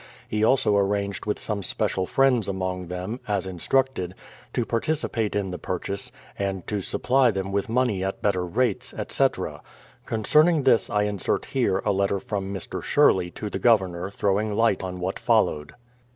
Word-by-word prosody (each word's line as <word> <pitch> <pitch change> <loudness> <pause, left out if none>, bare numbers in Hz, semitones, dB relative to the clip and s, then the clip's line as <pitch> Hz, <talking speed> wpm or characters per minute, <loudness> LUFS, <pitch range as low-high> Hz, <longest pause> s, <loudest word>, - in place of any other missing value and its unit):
He 110 0 -1
also 110 -3 +3
ar 100 - +4
ranged 100 0 -2
w^ith 105 - -1
some 105 -2 -3
special 95 0 -1
friends 130 -5 +3
among 95 -2 -3
them, 90 +7 -4
as 100 -3 0
instructed, 95 +1 0 0.4
to 120 - -1
participate 115 -3 -1
in 100 -2 -1
the 90 - -5
purchase, 95 +4 -4 0.3
and 95 -2 -2
to 105 -2 -2
supply 130 +6 +2
them 95 -2 -2
vv^ith 100 +1 -1
money 115 -5 +1
at 95 0 -3
better 95 -3 +1
rates, 105 +5 -1
etc. - - -1 0.5
Concerning 150 +8 +3
this 130 -1 +3
I 105 -3 +1
insert 105 -2 -1
here 120 -8 0
a - - +3
letter 100 0 +1
from 100 -1 -4
Mr. 95 -3 -5
Sherley 90 -2 +3
to 105 - -4
the - - -3
Governor 95 -6 +2
throwing 100 +1 0
light 115 -3 +2
on 90 -1 -5
what 90 +2 -3
followed. 75 0 +1
100 Hz, 165 wpm, -25 LUFS, 95-115 Hz, 0.5 s, ar